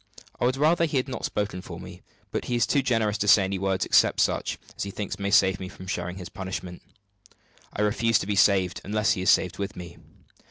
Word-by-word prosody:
I - - +1
would 130 +2 +1
rather 165 +4 +3
he 150 -3 -1
had 130 0 -2
spoken 100 -3 -3
for 85 -1 -9
me; 90 0 -11 0.3
but - - -3
he 120 - -1
is 120 - +3
too 140 - +2
generous 115 -5 0
to 105 - -1
say 100 -1 +7
any 95 0 -2
words 95 -1 0
except - - +3
such - - 0 0.2
as - - -7
he 100 - -2
thinks 100 0 -5
may 100 0 -1
save 95 -2 +4
me 95 - -6
from 95 - -11
sharing 90 -1 -4
his 90 -3 -7
punishment. 95 -1 -6 0.9
I 105 - -2
refuse 115 +1 +2
to - - -3
be 105 0 -1
saved, 95 -3 +3
unless 105 +1 +1
he 110 - 0
is 95 - +1
saved 95 +1 +2
with 100 0 -4
me. 85 -1 -10
100 Hz, 230 wpm, -26 LUFS, 95-110 Hz, 0.9 s, say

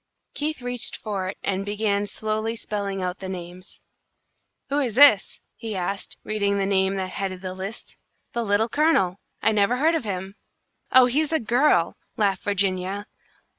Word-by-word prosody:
Keith 300 -3 -3
reached 245 -1 -2
for 200 -4 -3
it, 190 - -5
and 195 0 -1
began 205 0 0
slowly 215 +2 -2
spelling 200 -3 -3
out 180 +1 -3
the 190 - -6
names. 180 0 -9 0.9
"Who 285 +1 +1
is 245 -7 -1
this?" 265 -7 +6
he 225 -3 -5
asked, 195 +2 -3
reading 200 -2 0
the 195 - +1
name 190 0 +2
that 190 -1 -3
headed 190 -2 -4
the 185 -1 -4
list. 195 +4 -6 0.4
"'The 235 - -1
Little 205 +1 +2
Colonel!' 225 - +2 0.2
I - - +4
never 210 +3 +2
heard 315 +5 +3
of 325 - 0
him," 195 -1 -5 0.5
"Oh, 260 -1 +8
he's 290 +5 +1
a 320 - +2
girl!" 235 - +2 0.2
laughed 200 -3 +1
Virginia. 195 0 -1
205 Hz, 165 wpm, -24 LUFS, 190-230 Hz, 0.9 s, Oh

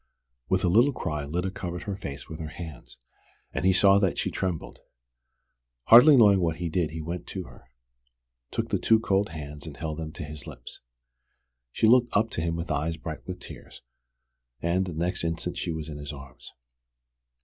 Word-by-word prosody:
With 95 0 +2
a - - +3
little 120 +10 +5
cry 75 - -3
Lyda 90 +6 -2
covered 90 -2 -5
her 100 -2 -3
face 70 -6 -7
with 80 - -8
her 80 - -4
hands, 80 -6 -9 0.6
and - - -2
he 95 - +5
saw 100 +2 +5
that 95 -3 +1
she - - -1
trembled. 90 -4 -3 1.1
Hardly 130 +6 +10
knowing 100 -5 +7
what 85 -3 +1
he 85 0 -3
did 80 -1 0
he 80 0 -6
went 85 +2 -5
to 95 - -5
her, 65 - -16 0.8
took - - -2
the - - +1
two 110 -1 +4
cold 100 -2 +1
hands 75 -1 -8
and 75 - -9
held 80 0 -4
them 80 -1 -5
to - - -6
his 75 -1 -9
lips. - - -7 0.9
She - - +1
looked 120 0 +5
up 115 +2 +1
to - - -2
him 85 0 -1
with 85 +1 -4
eyes 80 +2 -1
bright 80 0 -7
with 90 -1 -5
tears, - - -11 0.8
and 90 +5 0
the 90 - -5
next 90 +3 -1
instant 85 +1 -2
she 85 - -2
was 80 -1 -4
in 75 -2 -7
his 75 -1 -6
arms. 70 -3 -10
85 Hz, 195 wpm, -27 LUFS, 80-95 Hz, 1.1 s, Hardly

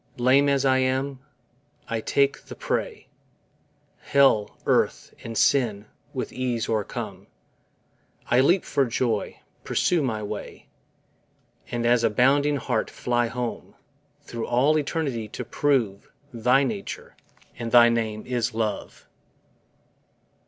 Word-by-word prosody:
Lame 130 +3 +4
as 140 -1 +1
I 130 -1 +4
am, 130 +1 -1 0.7
I 115 -1 -2
take 140 +4 +1
the - - -9
prey, - - -3 0.9
Hell, 135 -7 +2
earth, - - +1
and 115 -1 -6
sin 110 -7 +2 0.3
with 130 - -5
ease 125 -3 -2
o'ercome; 110 -3 -4 1.0
I 120 - +3
leap 170 +8 +4
for 135 -2 +1
joy, 115 -2 -2 0.2
pursue 175 -3 +1
my 110 -6 -2
way, 105 0 -7 1.0
And 120 -1 -2
as 120 0 +3
a 115 - +4
bounding 140 +6 +3
hart 120 -4 -1
fly 120 -1 0
home, 120 0 -5 0.5
Thro' 115 -1 -5
all 130 +6 +3
eternity 140 -7 -2
to 120 +3 -7
prove 120 -7 0 0.2
Thy 125 +4 +3
nature, 110 -7 -5 0.4
and 115 -1 -4
thy 120 -1 +8
name 110 -2 -2
is 120 -3 -2
LOVE. 110 -2 -4
120 Hz, 120 wpm, -25 LUFS, 115-135 Hz, 1.0 s, thy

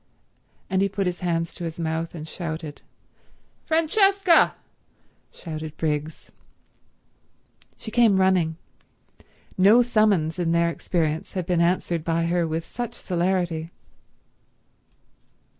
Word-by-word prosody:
And 190 0 0
he 200 - +2
put 195 0 -2
his 180 -1 -2
hands 165 -2 -1
to 175 - -8
his 165 0 -5
mouth 165 +1 -3
and 155 -1 -7
shouted. 160 -3 -6 0.9
"Francesca!" 385 +3 +4 0.8
shouted 155 -2 -7
Briggs. 150 0 -3 1.5
She 220 - -8
came 225 -4 +4
running. 180 -4 +2 1.0
No 215 +6 +6
summons 205 -9 +2
in 170 -1 +1
their 170 0 +2
experience 160 -2 -2
had 185 -3 -3
been 175 -1 +1
answered 170 -1 0
by 165 0 0
her 170 0 +1
with 160 +1 -3
such 240 -1 -6
celerity. 175 -3 -1
170 Hz, 110 wpm, -24 LUFS, 160-195 Hz, 1.5 s, No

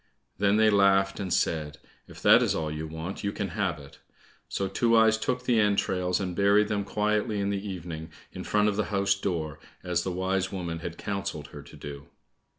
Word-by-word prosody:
Then 100 +1 +3
they 110 0 +5
laughed 95 -1 +3
and 95 -3 -4
said, 75 -3 0 0.3
"If - - -13
that's - - +6
all 80 -1 -2
you 75 +1 -4
want, 80 +4 -6
you 100 - 0
can 100 -1 -3
have 90 -3 -1
it." 70 -1 -14 0.5
So 100 - -1
Two 115 +4 +2
eyes 110 0 +5
took 125 +3 -2
the 120 -3 +3
entrails 95 -3 +1
and 90 -3 -3
buried 100 +2 +4
them 105 -2 0
quietly 105 +1 0
in 100 0 0
the 100 +1 -3
evening, 85 -3 -6 0.2
in - - -7
front 105 0 +2
of 105 -1 0
the 105 - +1
house 100 -1 +1
door, 85 -7 -3 0.2
as 90 -2 0
the 95 - -3
wise 95 +1 -1
woman 85 -4 -4
had 85 0 -6
counselled 100 -6 -4
her - - -9
to - - -14
do. 70 -1 -9
95 Hz, 200 wpm, -27 LUFS, 85-105 Hz, 0.5 s, that's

